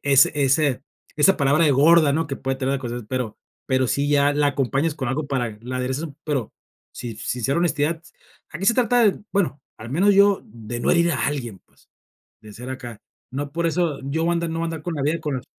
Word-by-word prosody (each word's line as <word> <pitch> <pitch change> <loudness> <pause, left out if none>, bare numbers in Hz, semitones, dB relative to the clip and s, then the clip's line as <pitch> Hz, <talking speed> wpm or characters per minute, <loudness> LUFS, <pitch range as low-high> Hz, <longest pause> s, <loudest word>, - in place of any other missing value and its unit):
ese 140 -1 +5
ese 140 -1 +2 0.3
esa 185 +6 +5
palabra 145 +3 +3
de 150 - +4
gorda, 150 +2 +5
¿no? 160 +2 0
Que 135 -2 -4
puede 135 0 -3
traer 135 0 -1
cosas, 120 -2 -5
pero 125 -4 -3 0.3
pero 130 -2 +2
sí 140 +3 0
ya 145 0 +3
la 145 0 +2
acompañas 140 +3 0
con 135 -4 -3
algo 140 +4 -2
para 120 -6 -2
la 125 +2 -5
aderezas 130 +4 -2
u 145 -4 -9
pero, 140 -7 -2 0.4
si 120 -3 -7
sincera 125 +5 -1
honestidad, 160 -1 0 0.5
aquí 170 +5 -5
se 230 - +4
trata 245 0 +3
de, - - -10
bueno, 175 -8 0 0.2
al 110 +2 -9
menos 195 +8 +3
yo, 200 0 +5
de 115 +1 -8
no - - -2
herir 170 0 +3
a 140 - 0
alguien, 125 -8 -4
pues, - - -30 0.5
de 105 -1 -13
ser 125 +4 -8
acá. 120 -4 -7 0.3
No 140 +2 -5
por 170 +1 -1
eso, 165 -3 -1
yo 155 +4 -1
voy 170 - +2
andar 170 -1 -2
no 165 - -3
voy - - -1
andar 165 -2 -5
con 175 +1 -4
la 145 - -3
vida, 155 +4 0
con 150 -3 -2
la 125 - -7
140 Hz, 225 wpm, -22 LUFS, 130-165 Hz, 0.5 s, ese